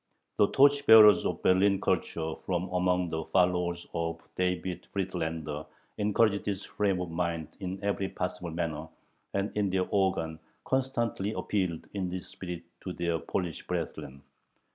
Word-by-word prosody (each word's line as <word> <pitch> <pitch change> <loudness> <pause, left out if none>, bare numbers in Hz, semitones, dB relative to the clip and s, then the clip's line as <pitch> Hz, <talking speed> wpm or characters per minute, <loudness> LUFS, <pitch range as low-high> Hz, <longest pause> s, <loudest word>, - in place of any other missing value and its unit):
The 105 - +5
torch 140 +3 +4
bearers 105 -4 +9
of 90 -1 -4
Berlin 95 +1 +4
culture 80 -1 -1
from 90 0 -1
among 90 -1 +1
the 80 0 -2
followers 90 -1 +1
of 85 0 -2 0.2
David 90 0 -2
Friedländer 80 -5 -3 0.3
encouraged 105 0 +2
this 100 -1 -2
frame 100 -3 0
of 90 -2 -4
mind 85 -2 -2
in 95 -1 -4
every 100 -1 0
possible 90 -1 -4
manner, 80 -2 -3 0.5
and 100 +1 0
in 105 -2 +1
their 95 0 +1
organ 90 -5 +1 0.3
constantly 120 -6 0
appealed 90 -6 -1
in 95 -3 -2
this 90 0 -5
spirit 90 -2 -7 0.2
to 90 - -5
their 85 -2 -1
Polish 85 -2 -3
brethren. 70 +1 -4
90 Hz, 140 wpm, -29 LUFS, 85-100 Hz, 0.5 s, bearers